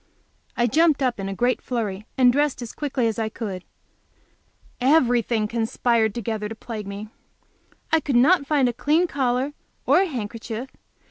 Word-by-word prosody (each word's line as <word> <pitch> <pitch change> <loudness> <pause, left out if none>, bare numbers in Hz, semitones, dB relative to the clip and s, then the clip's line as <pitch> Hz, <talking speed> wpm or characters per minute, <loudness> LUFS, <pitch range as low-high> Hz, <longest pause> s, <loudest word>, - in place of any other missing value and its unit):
I 240 - +3
jumped 310 +3 +3
up 250 -4 0
in 195 0 -3
a 195 - -4
great 245 +2 +1
flurry 215 -4 -3
and 250 -2 +5
dressed 290 -2 0
as 230 - -8
quickly 275 -4 -1
as 225 0 -1
I 220 -1 -1
could. 200 -5 -6 1.2
Everything 245 -5 +3
conspired 225 -1 0
together 220 -2 -3
to 225 - -6
plague 215 -2 -7
me. 200 +2 -7 0.8
I 320 - +5
could 285 -3 -2
not 280 +4 +4
find 280 -4 +3
a 240 - -1
clean 310 +8 +2
collar, 265 -2 -1 0.3
or - - +5
a 390 - +1
handkerchief. 230 - -5
240 Hz, 160 wpm, -23 LUFS, 220-275 Hz, 1.2 s, and